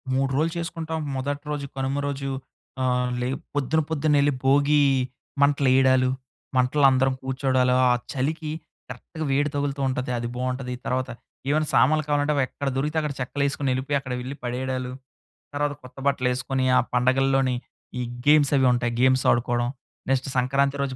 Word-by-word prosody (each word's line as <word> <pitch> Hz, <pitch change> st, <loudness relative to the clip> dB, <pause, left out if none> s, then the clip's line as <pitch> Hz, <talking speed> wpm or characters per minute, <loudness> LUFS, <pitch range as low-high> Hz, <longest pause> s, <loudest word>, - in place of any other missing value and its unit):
3 135 Hz, 0 st, +1 dB
రోజులు 160 Hz, +2 st, +1 dB
చేసుకుంటాం. 165 Hz, -1 st, -4 dB, 0.2 s
మొదటి 140 Hz, +2 st, -3 dB
రోజు, 145 Hz, -1 st, -3 dB
కనుమ 135 Hz, +1 st, -1 dB
రోజు 135 Hz, -1 st, -3 dB, 0.5 s
ఆహ్, 125 Hz, -1 st, +1 dB
లే 125 Hz, -, 0 dB, 0.3 s
పొద్దున 145 Hz, +3 st, +1 dB
పొద్దునెళ్ళి 145 Hz, -2 st, +2 dB
భోగి 145 Hz, +2 st, +4 dB, 0.6 s
మంటలు 140 Hz, -1 st, +3 dB
వేయడాలు, 130 Hz, -1 st, +4 dB, 0.5 s
మంటలు 130 Hz, +3 st, +3 dB
అందరం 135 Hz, 0 st, +2 dB
కూర్చోవడాలు. 130 Hz, -1 st, +1 dB, 0.2 s
ఆ -, -, +5 dB, 0.2 s
చలికి 150 Hz, +4 st, -2 dB, 0.4 s
కరెక్ట్‌గా 160 Hz, -1 st, -7 dB
వేడి 145 Hz, +2 st, +2 dB
తగులుతూ 140 Hz, -1 st, -1 dB
ఉంటుంది. 125 Hz, -1 st, -2 dB
అది 120 Hz, 0 st, -3 dB
బాగుంటది. 125 Hz, 0 st, -3 dB
తర్వాత 130 Hz, 0 st, -1 dB, 0.4 s
ఏమైనా 155 Hz, +1 st, +1 dB
సామాన్లు 150 Hz, +5 st, +4 dB
కావాలంటే, 145 Hz, 0 st, +1 dB
అవి 140 Hz, -, +2 dB
ఎక్కడ 140 Hz, -, -5 dB
దొరికితే 150 Hz, +4 st, -1 dB
అక్కడ 150 Hz, -2 st, -3 dB
చెక్కలు 135 Hz, +2 st, -2 dB
వేసుకొని 140 Hz, 0 st, -1 dB
వెళ్ళిపోయి 135 Hz, +3 st, 0 dB
అక్కడ 130 Hz, -2 st, -6 dB
వెళ్ళి 130 Hz, +3 st, -6 dB
పడేయడాలు. 125 Hz, +1 st, -3 dB, 0.6 s
తర్వాత 145 Hz, 0 st, 0 dB
కొత్త 125 Hz, +1 st, -14 dB
బట్టలు 135 Hz, -2 st, +1 dB
వేసుకొని, 130 Hz, +1 st, -1 dB
ఆ -, -, +6 dB, 0.2 s
పండగల్లోని 130 Hz, +1 st, +2 dB, 0.4 s
ఈ -, -, -1 dB, 0.2 s
గేమ్స్ 150 Hz, -1 st, +5 dB
అవి 130 Hz, -1 st, +4 dB
ఉంటాయి. 120 Hz, -1 st, -1 dB
గేమ్స్ 130 Hz, 0 st, +4 dB
ఆడుకోవడం. 120 Hz, 0 st, 0 dB, 0.4 s
నెక్స్ట్ 130 Hz, 0 st, +1 dB
సంక్రాంతి 140 Hz, +2 st, +1 dB
రోజు 135 Hz, -2 st, -3 dB
135 Hz, 155 wpm, -24 LUFS, 130-145 Hz, 0.6 s, ఆ